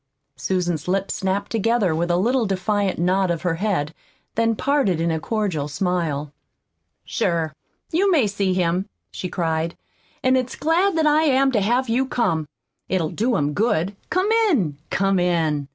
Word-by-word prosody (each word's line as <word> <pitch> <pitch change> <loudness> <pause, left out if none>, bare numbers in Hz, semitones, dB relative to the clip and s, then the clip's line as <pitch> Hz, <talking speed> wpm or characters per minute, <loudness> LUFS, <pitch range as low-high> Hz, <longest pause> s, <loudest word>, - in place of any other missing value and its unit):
Susan's 175 -4 -2
lips 195 +1 0
snapped 190 +1 -2
together 225 -4 +1
with 170 +2 -1
a 175 - +2
little 235 +4 +1
defiant 195 +1 0
nod 185 +2 +1
of 170 0 -2
her 180 -2 +1
head, 175 -6 -1 0.4
then 230 0 +1
parted 270 - +1
in 165 0 +1
a 160 - -1
cordial 190 -7 -2
smile. 150 -3 -2 0.7
"Sure, 165 -2 -1 0.4
you 385 +5 +2
may 310 - +4
see 200 -2 0
him," 180 +1 0 0.2
she 180 - -5
cried, 165 -1 -2 0.5
"an' 255 0 +4
it's 255 -1 -1
glad 335 +4 +1
that 320 - +2
I 305 +1 +4
am 270 -1 +3
to 220 -5 +1
have 240 +6 +1
you 250 +4 +1
come! 165 - 0 0.4
It'll 175 -4 0
do 235 +3 0
him 145 0 0
good. 200 -2 0
Come 375 +4 +1 0.2
in, 185 - +1
come 195 0 +1
in!" 160 -5 0
190 Hz, 165 wpm, -22 LUFS, 170-240 Hz, 0.7 s, may